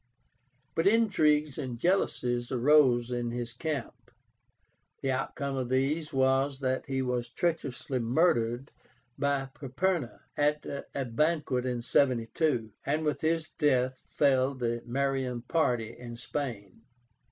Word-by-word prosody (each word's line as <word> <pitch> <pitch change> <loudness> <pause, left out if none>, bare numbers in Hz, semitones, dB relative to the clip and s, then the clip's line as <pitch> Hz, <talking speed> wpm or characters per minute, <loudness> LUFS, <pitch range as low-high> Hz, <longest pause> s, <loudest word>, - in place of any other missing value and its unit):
But 165 +5 +2
intrigues 155 - +3
and 130 -4 -4
jealousies 120 -7 0
arose 125 -2 +4
in 120 -1 -1
his 120 -1 -4
camp. 145 -1 -5 0.9
The 135 - +1
outcome 140 +1 -2
of 130 -2 -2
these 140 +5 0
was 135 +1 +2
that 130 +1 -1
he 135 -1 -1
was 125 -1 -1
treacherously 140 -3 -2
murdered 120 -1 +1 0.5
by 140 -1 0
Perperna 145 +1 -2
at 150 +1 +1
a 140 -1 -4
banquet 130 0 0
in 120 -2 -2
72, 125 -1 +1
and 155 +3 0
with 150 - -1
his 160 0 0
death 130 -3 +1
fell 135 -1 +2
the 120 -2 -2
Marian 130 -1 -1
party 120 -6 0
in 120 -1 -9
Spain. 115 -7 -5
130 Hz, 120 wpm, -29 LUFS, 120-150 Hz, 0.9 s, arose